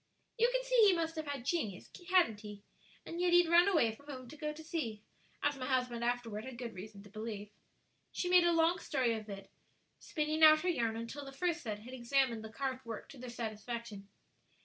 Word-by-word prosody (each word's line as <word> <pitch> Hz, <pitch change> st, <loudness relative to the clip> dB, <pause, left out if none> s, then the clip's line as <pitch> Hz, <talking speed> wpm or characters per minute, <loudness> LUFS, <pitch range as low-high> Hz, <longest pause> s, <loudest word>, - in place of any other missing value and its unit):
"You 470 Hz, +1 st, +4 dB
can -, -, 0 dB
see -, -, +4 dB
he 390 Hz, -, +6 dB
must 330 Hz, -1 st, -1 dB
have 315 Hz, -1 st, -4 dB
had 280 Hz, -4 st, -4 dB
genius; 225 Hz, -, -2 dB, 0.2 s
hadn't 345 Hz, -, +4 dB
he? 210 Hz, -1 st, -9 dB, 0.4 s
and 340 Hz, +1 st, -4 dB
yet 355 Hz, -1 st, +3 dB
he'd 350 Hz, -1 st, +6 dB
run 345 Hz, +3 st, +6 dB
away 315 Hz, -, +3 dB
from 285 Hz, +6 st, -18 dB
home 255 Hz, -3 st, -7 dB
to 310 Hz, -, -10 dB
go 300 Hz, 0 st, -3 dB
to 310 Hz, +1 st, -10 dB
sea, 235 Hz, -10 st, -4 dB, 0.4 s
as 290 Hz, -1 st, +1 dB
my 255 Hz, -, -3 dB
husband 250 Hz, -3 st, 0 dB
afterward 235 Hz, -3 st, -1 dB
had 260 Hz, -1 st, -8 dB
good 240 Hz, -2 st, -5 dB
reason 200 Hz, +1 st, -9 dB
to 205 Hz, -, -14 dB
believe." 215 Hz, -1 st, -6 dB, 0.6 s
She 360 Hz, -, -2 dB
made 360 Hz, 0 st, +6 dB
a 345 Hz, -, +4 dB
long 330 Hz, +1 st, +3 dB
story 255 Hz, -6 st, 0 dB
of 215 Hz, -1 st, -6 dB
it, 195 Hz, -1 st, -8 dB, 0.5 s
spinning 310 Hz, 0 st, -2 dB
out 310 Hz, 0 st, +9 dB
her 365 Hz, -, 0 dB
yarn 230 Hz, -9 st, 0 dB
until 230 Hz, +5 st, -6 dB
the 275 Hz, -, -8 dB
first 340 Hz, +4 st, -1 dB
set 210 Hz, -3 st, -4 dB
had 250 Hz, +4 st, -10 dB
examined 245 Hz, -2 st, +1 dB
the 220 Hz, -, -7 dB
carved 260 Hz, +2 st, -3 dB
work 230 Hz, -3 st, -7 dB
to 275 Hz, -, -12 dB
their 250 Hz, 0 st, -7 dB
satisfaction. 220 Hz, -2 st, -6 dB
255 Hz, 215 wpm, -34 LUFS, 225-325 Hz, 0.6 s, out